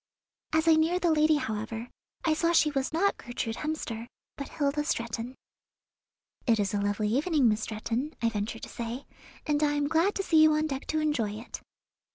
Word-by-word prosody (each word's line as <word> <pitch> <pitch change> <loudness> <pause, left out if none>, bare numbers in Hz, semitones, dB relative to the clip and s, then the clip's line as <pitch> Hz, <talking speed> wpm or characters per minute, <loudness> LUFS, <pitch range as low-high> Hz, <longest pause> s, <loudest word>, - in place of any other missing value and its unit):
As 315 +1 +2
I 325 - +8
neared 325 +3 +2
the 340 - +4
lady, 310 0 +4
however, 225 -3 -3 0.4
I 320 - +4
saw 335 +2 +1
she 310 -2 +4
was 270 -2 -1
not 380 +5 +2
Gertrude 235 -1 -4
Hemster, 245 -7 -4 0.3
but 280 - -6
Hilda 295 0 0
Stretton. 235 -2 -3 1.1
"It 225 -2 +4
is 200 -1 0
a 205 - 0
lovely 205 +1 0
evening, 285 +2 +2
Miss 215 0 +2
Stretton," 230 +7 -3
I 230 - +2
ventured 220 +1 -4
to - - -6
say, 235 +3 -5 0.4
"and 295 0 +1
I 295 -1 +3
am 290 -1 0
glad 330 +6 +2
to 390 - -1
see 320 -4 +4
you 310 0 +6
on 305 0 +1
deck 275 -3 -4
to 310 - 0
enjoy 255 -9 0
it." 220 +3 -8
280 Hz, 195 wpm, -28 LUFS, 225-315 Hz, 1.1 s, I